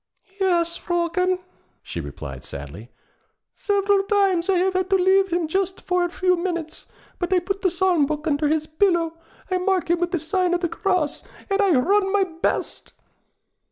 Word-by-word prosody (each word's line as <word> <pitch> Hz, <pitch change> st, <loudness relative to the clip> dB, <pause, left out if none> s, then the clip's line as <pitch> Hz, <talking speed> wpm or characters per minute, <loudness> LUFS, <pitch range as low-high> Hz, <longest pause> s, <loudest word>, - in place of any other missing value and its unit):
'Yes, 340 Hz, -3 st, +1 dB
Fróken,' 350 Hz, +1 st, 0 dB, 0.5 s
she 85 Hz, -, -5 dB
replied 70 Hz, -2 st, -8 dB
sadly, 75 Hz, -, -8 dB, 0.6 s
'several 400 Hz, -1 st, +1 dB
times 390 Hz, -4 st, +2 dB
I 380 Hz, -, +4 dB
have 375 Hz, +1 st, +1 dB
had 370 Hz, 0 st, -1 dB
to 390 Hz, -, +4 dB
leave 380 Hz, 0 st, +3 dB
him 340 Hz, -1 st, 0 dB
just 380 Hz, +3 st, -1 dB
for 360 Hz, -1 st, 0 dB
a 350 Hz, -, 0 dB
few 365 Hz, +1 st, +1 dB
minutes. 340 Hz, -3 st, -4 dB, 0.3 s
But 355 Hz, 0 st, -2 dB
I 375 Hz, -, +4 dB
put 390 Hz, +3 st, -2 dB
the 375 Hz, -, +3 dB
Psalm 350 Hz, -4 st, +2 dB
book 305 Hz, +1 st, -3 dB
under 300 Hz, -1 st, +1 dB
his 310 Hz, +1 st, +1 dB
pillow, 330 Hz, 0 st, +1 dB, 0.4 s
I 370 Hz, -, +1 dB
mark 365 Hz, -2 st, 0 dB
him 345 Hz, -, +2 dB
with 350 Hz, 0 st, 0 dB
the 355 Hz, -, -1 dB
sign 355 Hz, +3 st, 0 dB
of 350 Hz, -, -2 dB
the 345 Hz, -, 0 dB
Cross, 360 Hz, -5 st, -1 dB, 0.3 s
and 395 Hz, -, +2 dB
_I 345 Hz, -11 st, +3 dB
run 390 Hz, 0 st, +2 dB
my 405 Hz, -1 st, +3 dB
best! 335 Hz, -2 st, -3 dB
355 Hz, 180 wpm, -23 LUFS, 325-380 Hz, 0.6 s, I